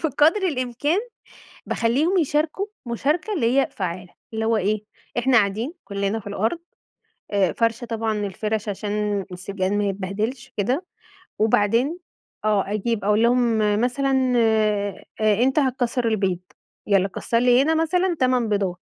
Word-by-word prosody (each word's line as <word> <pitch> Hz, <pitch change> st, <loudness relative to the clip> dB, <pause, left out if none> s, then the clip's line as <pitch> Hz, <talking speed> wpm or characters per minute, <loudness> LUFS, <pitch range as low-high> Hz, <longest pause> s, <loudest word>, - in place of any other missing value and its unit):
بقدر 310 Hz, +7 st, +3 dB
الإمكان 285 Hz, -, 0 dB, 0.7 s
باخلّيهم 280 Hz, +11 st, +1 dB
يشاركوا 310 Hz, +4 st, 0 dB, 0.2 s
مشاركة 290 Hz, -, -1 dB
اللي 265 Hz, -, +2 dB
هي -, -, +2 dB
فعالة، 180 Hz, -1 st, -5 dB, 0.2 s
اللي 220 Hz, 0 st, -1 dB
هو 225 Hz, -1 st, +2 dB
إيه، 210 Hz, +2 st, 0 dB, 0.3 s
إحنا 250 Hz, +1 st, +4 dB
قاعدين 220 Hz, +7 st, +1 dB
كلّنا 200 Hz, +1 st, -2 dB
في 205 Hz, -, -11 dB
الأرض 220 Hz, -, -1 dB, 0.7 s
آآ 195 Hz, -3 st, +2 dB
فارشة 230 Hz, +1 st, 0 dB
طبعًا 225 Hz, -1 st, -2 dB
الفَرْش 210 Hz, +2 st, -3 dB
عشان 205 Hz, -1 st, -2 dB
السجاد 190 Hz, +1 st, -3 dB
ما 205 Hz, 0 st, +1 dB
يتبهدلش 210 Hz, +7 st, -3 dB
كده 255 Hz, -, 0 dB, 0.5 s
وبعدين 230 Hz, -, +2 dB, 0.5 s
آه، 205 Hz, -2 st, +1 dB
أجيب 215 Hz, +1 st, -1 dB
أقول 210 Hz, +2 st, +3 dB
لهم 235 Hz, -1 st, +3 dB, 0.2 s
مثلًا 260 Hz, 0 st, +1 dB
آآ 215 Hz, -3 st, +1 dB, 0.4 s
أنت 265 Hz, +3 st, +3 dB
هتكسّر 250 Hz, -2 st, 0 dB
البيض، 195 Hz, -5 st, 0 dB, 0.5 s
يالّا 195 Hz, -2 st, +3 dB
كسّر 230 Hz, +4 st, -1 dB
لي 245 Hz, +1 st, +5 dB
هنا 320 Hz, +2 st, +2 dB
مثلًا 355 Hz, +3 st, +1 dB
8 255 Hz, -3 st, +2 dB
بيضات 195 Hz, -4 st, -1 dB
230 Hz, 135 wpm, -23 LUFS, 205-265 Hz, 0.7 s, لي